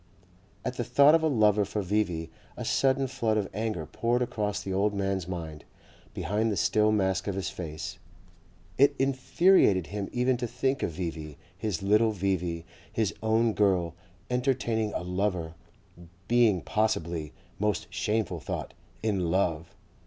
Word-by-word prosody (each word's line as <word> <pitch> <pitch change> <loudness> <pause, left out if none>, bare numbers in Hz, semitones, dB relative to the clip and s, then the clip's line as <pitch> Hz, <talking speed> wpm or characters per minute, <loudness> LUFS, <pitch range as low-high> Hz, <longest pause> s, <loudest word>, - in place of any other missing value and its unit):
At 125 0 -3
the 120 - 0
thought 140 +6 +5
of 165 - +5
a 160 - +2
lover 105 -6 +3
for 100 +1 -3
V.V. 90 -5 -1 0.3
a - - -5
sudden 135 0 +2
flood 115 -4 0
of 105 - 0
anger 105 -6 -2
poured 120 +10 0
across 105 -4 -2
the 95 - -4
old 100 +2 +1
man's 95 -2 -1
mind, 80 -4 -6 0.5
behind 110 +2 0
the 100 - -2
still 105 +5 +3
mask 95 -2 +1
of 100 - -1
his 95 - -3
face. 80 -3 -6 0.8
It 140 +1 +5
infuriated 135 - +3
him 100 -2 -3
even 125 +1 +1
to 120 0 -3
think 130 +3 -1
of 85 - -1
V.V., 80 -3 -5 0.2
his 95 -3 -3
little 110 +2 +4
V.V., 90 -4 -1 0.3
his 110 -3 0
own 110 +1 +2
girl, 95 -6 +2 0.4
entertaining 125 -4 0
a - - -2
lover, 90 -3 -1 0.7
being 115 -6 +4
possibly 85 -8 -1 0.3
most 105 -2 0
shameful 105 -5 -1
thought 70 - -5 0.3
IN 95 -6 0
LOVE! 85 -3 0
105 Hz, 150 wpm, -28 LUFS, 90-115 Hz, 0.8 s, thought